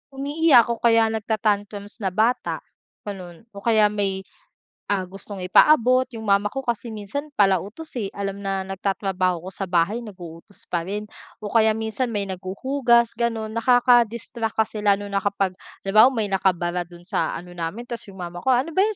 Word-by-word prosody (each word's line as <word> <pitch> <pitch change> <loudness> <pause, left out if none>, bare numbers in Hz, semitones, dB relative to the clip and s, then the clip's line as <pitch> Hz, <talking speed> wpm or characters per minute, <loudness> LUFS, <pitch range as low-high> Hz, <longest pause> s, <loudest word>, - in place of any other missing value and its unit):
Umiiyak 280 -3 +4
o 230 - -3
kaya 225 -1 +4
nag-ta-tantrums 210 -1 -2
na 200 - -1
bata, 220 +7 0 0.4
gano'n 185 -4 -8
o 200 - -9
kaya 215 -1 +3
may, 195 -2 -1 0.6
ah, 200 -2 0
gustong 195 +1 -9
ipaabot 255 +5 +5
'yong 230 -3 -9
mama 200 -1 +3
ko 270 +6 -5
kasi 240 -2 -2
minsan 220 +6 -5
pala 195 -3 +4
utos, 225 - -9
eh. 205 - -2
Alam 200 0 -4
na 195 -1 -2
nagtatrabaho 190 -2 -1
ko 185 - -6
sa 195 +1 -5
bahay 175 +5 +1
nag-uutos 185 -3 -10
pa 170 -1 -1
rin 205 +2 -3 0.4
o 205 - -4
kaya 220 -1 +4
minsan 220 +3 -2
may 205 - +1
naghuhugas 235 +6 +1
gano'n, 225 -2 -2
nakaka-distract 235 -1 +2
kasi 220 -1 0
lalo 205 -1 +2
na 200 - +1
kapag, 200 -1 0 0.3
halimabawa 215 +7 +5
may 210 -3 -1
nakabara 180 -2 0
do'n 175 0 -14
sa 175 - -1
ano 180 +1 -8
namin, 175 +6 -5
ta's 235 -3 -7
'yong 195 - -12
mama 175 -1 -7
ko, 255 +8 +3
"Ano 260 +7 -1
ba 380 +6 +3
'yon, 435 - -3
205 Hz, 175 wpm, -23 LUFS, 190-235 Hz, 0.6 s, ipaabot